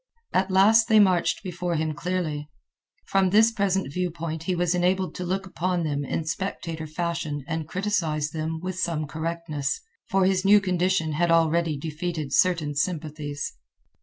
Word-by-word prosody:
At 190 +1 +2
last 215 +4 +5
they 220 -1 +6
marched 185 -3 +3
before 180 -2 -3
him 155 0 -1
clearly. 170 -3 -3 0.6
From 195 -1 +2
this 220 +4 +5
present 195 -8 0
view 180 +1 0
point 160 -1 -5
he 185 - 0
was 175 0 +1
enabled 180 +1 +1
to 180 - -5
look 190 +2 -2
upon 180 -1 -1
them 145 -2 -1
in 155 +3 -2
spectator 165 -2 -4
fashion 155 -3 -3
and 160 -2 -3
criticise 160 -6 -1
them 160 +1 -3
with 185 +1 -4
some 165 -4 -1
correctness, 160 -2 -3 0.3
for 190 -1 +3
his 185 0 +2
new 205 +1 +7
condition 180 -3 +1
had 170 +3 +1
already 165 -1 +3
defeated 155 -1 -4
certain 165 -5 +2
sympathies. 145 - -3
170 Hz, 160 wpm, -25 LUFS, 155-185 Hz, 0.6 s, new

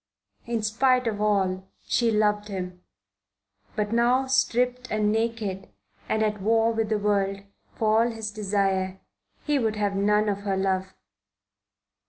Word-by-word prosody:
In 230 -2 -1
spite 250 +4 +2
of 210 -2 -2
all, 190 -3 +1 0.2
she 235 -1 +2
loved 210 -1 +1
him. 180 -3 -6 0.9
But 210 +1 -1
now, 245 +3 +3
stripped 250 -1 +1
and 210 -1 +1
naked 220 -4 -2 0.4
and 220 0 +1
at 210 -2 -1
war 225 +2 +3
with 225 -1 -1
the 215 - +1
world, 200 -1 0 0.3
for 220 0 +2
all 240 - 0
his 220 -1 -5
desire, 195 -2 -1 0.5
he 295 -2 +2
would 220 -3 0
have 205 -1 -1
none 210 +2 +2
of 200 -1 0
her 200 -1 -2
love. 190 0 -1
210 Hz, 145 wpm, -26 LUFS, 195-230 Hz, 0.9 s, now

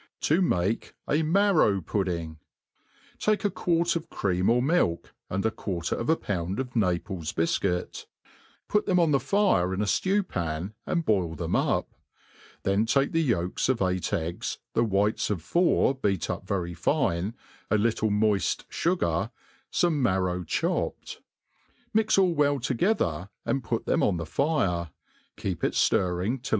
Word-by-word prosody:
Td 160 +5 +2
mate 95 - 0
a 150 - +2
Marrow 160 - +3
Pudding. 85 -4 -3 0.8
TAtCE 215 0 +1
a - - +4
()uarc 170 -1 +1
of 165 - -4
cream 90 -1 0
or 120 +1 +4
milk, 130 - +1 0.2
and 100 +2 -2
a 110 - +2
quarter 90 -6 -3
of 115 - -3
a 160 - +5
pound 95 - -3
of 130 -1 -4
Naples 90 -5 -1
bifcuit, 90 +2 -1 0.6
put 210 0 +1
them 180 -1 +3
on 165 -3 +3
the 140 - +4
fire 160 - +2
in - - -4
a - - +2
ftew 190 - +1
pan, 85 +3 -3
and 170 -2 0
boil 90 -6 +1
them - - -2
up; - - 0 0.7
then 100 +3 +1
take 135 +3 +2
the 165 - +2
yolks 100 - 0
of 130 -3 +2
eight 90 -1 -1
eggs, 85 +1 -2 0.2
the 115 - +3
whites 105 -1 +1
of 95 -7 -2
four 170 - +3
beat 100 - -1
up - - -6
very 90 -3 -2
fine, 105 - 0 0.3
a 110 - +3
little 110 0 +1
moid 105 -1 +1
fugar, 165 - 0 0.4
fome 175 -2 +2
marrow 95 -7 +1
chop* 80 - -1
ped; - - -8 0.8
mix 220 -1 +3
all 185 -3 +4
well 145 -2 +2
together, 115 - 0 0.2
and 135 -2 0
put 115 0 -2
them - - +1
on 95 - +2
the 85 - -3
fire^ 90 - 0 0.5
keep 95 -6 -4
it - - 0
Sirring 95 +7 +1
til! 135 - -7
105 Hz, 160 wpm, -27 LUFS, -, 0.8 s, a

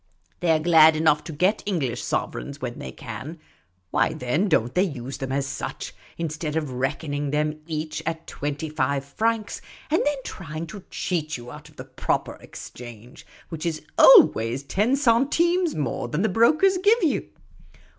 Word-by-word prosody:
They 175 -2 +2
're 160 - +4
glad 160 -1 +6
enough 155 -1 +2
to - - -6
get 185 +8 +1
English 140 - -2
sov^ereigns - - -3
when - - -5
they 65 - -6
can; 155 - -8 0.5
why, - - +2
then, 150 +11 0
don't 120 -6 +2
they 180 - +3
use 135 -8 -3
them 135 -1 -4
as 135 0 0
such, - - -5 0.2
instead 155 -1 -3
of 155 -4 -2
reckoning 145 +3 -2
them 150 +1 -1
each 155 -1 -4
at 165 0 -3
twenty 145 +2 -4
five 140 -2 -1
francs, 220 +8 -2 0.3
and 320 - +3
then 290 -1 0
trying 160 -2 -6
to 190 +3 -10
cheat 155 -5 -2
you 120 0 -10
out 150 +2 -11
of 150 - -22
the 130 - -9
proper 130 -1 -2
exchange, 120 0 -11 0.2
which 160 -2 -6
is 160 -3 -2 0.2
always 135 - +7
ten 210 - +1
centimes 295 +7 +2
more 145 -4 -2
than 150 - -1
the 220 - +2
brokers 310 - +4
give 425 +4 +3
you 310 - +1
155 Hz, 165 wpm, -24 LUFS, 140-200 Hz, 0.5 s, always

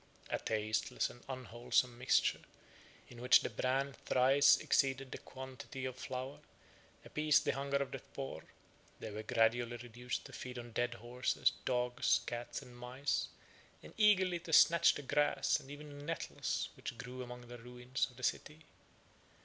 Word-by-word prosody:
A - - 0
tasteless 110 0 -1
and 120 - -16
unwholesome 125 -1 0
mixture, 125 +2 +2 0.7
in 120 -1 -11
which 125 - +7
the - - -3
bran 135 +2 0
thrice 135 +2 +6
exceeded 135 -1 +1
the - - -6
quantity 130 0 -8
of 130 -1 -3
flour, 130 +2 -5 0.7
appeased 150 -1 +3
the - - +3
hunger 140 0 -1
of 140 -1 -2
the 135 - -5
poor; 135 +1 -7 0.6
they - - -6
were 105 +1 -5
gradually 120 +1 +2
reduced 120 +1 -5
to - - -11
feed 125 0 -7
on 120 -1 -7
dead 120 +1 -1
horses, 120 +2 0
dogs, 125 -1 +2
cats, 120 +3 -5
and 125 -2 -14
mice, 125 +3 -2 0.6
and - - -12
eagerly 190 -5 +4
to 170 -1 -9
snatch 170 +1 +7
the 145 - -6
grass, 145 0 +2
and 135 - -14
even 145 0 -9
the - - -9
nettles, - - -2
which 120 - -6
grew 125 +1 -7
among 125 -1 -8
the 120 0 -9
ruins 125 +2 -3
of 125 - -19
the 130 - -11
city. 155 +5 -2
125 Hz, 160 wpm, -35 LUFS, 120-140 Hz, 0.7 s, which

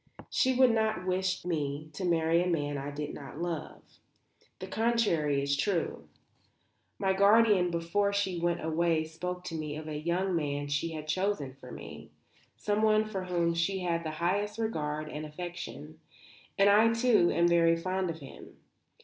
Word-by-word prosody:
She 260 -2 +2
would 255 -1 +6
not 220 -4 0
wish 185 -1 -1
me 155 -3 -3
to 195 - -6
marry 165 -1 +2
a 180 - 0
man 145 -4 -1
I 140 +1 -4
did 145 +1 -5
not 140 +1 -9
love. 170 -2 -4 0.7
The 185 - -7
contrary 190 -10 +1
is 140 0 +1
true. 175 +3 -1 0.9
My 195 -1 +1
guardian 200 -1 +5
before 170 +4 0
she 195 -3 -1
went 170 -1 -1
away 160 0 +1
spoke 180 +3 -5
to 175 -2 -5
me 155 -2 -4
of 155 +1 -7
a 155 - -4
young 175 +4 0
man 145 -2 -2
she 150 +3 -1
had 155 -1 -6
chosen 155 -5 -1
for 125 -2 -13
me, - - -10 0.5
someone 215 +1 +2
for 195 -4 -4
whom 170 -2 +1
she 185 +3 0
had 170 -2 -1
the 160 - -3
highest 205 +5 0
regard 155 -9 -2
and 150 0 -6
affection; 155 -2 -7 0.6
and 195 - +5
I, 215 +3 +5
too, 230 -7 +4
am 170 0 +3
very 165 -1 +4
fond 185 +1 -2
of 160 -1 -6
him. 135 - -12
170 Hz, 165 wpm, -30 LUFS, 155-195 Hz, 0.9 s, would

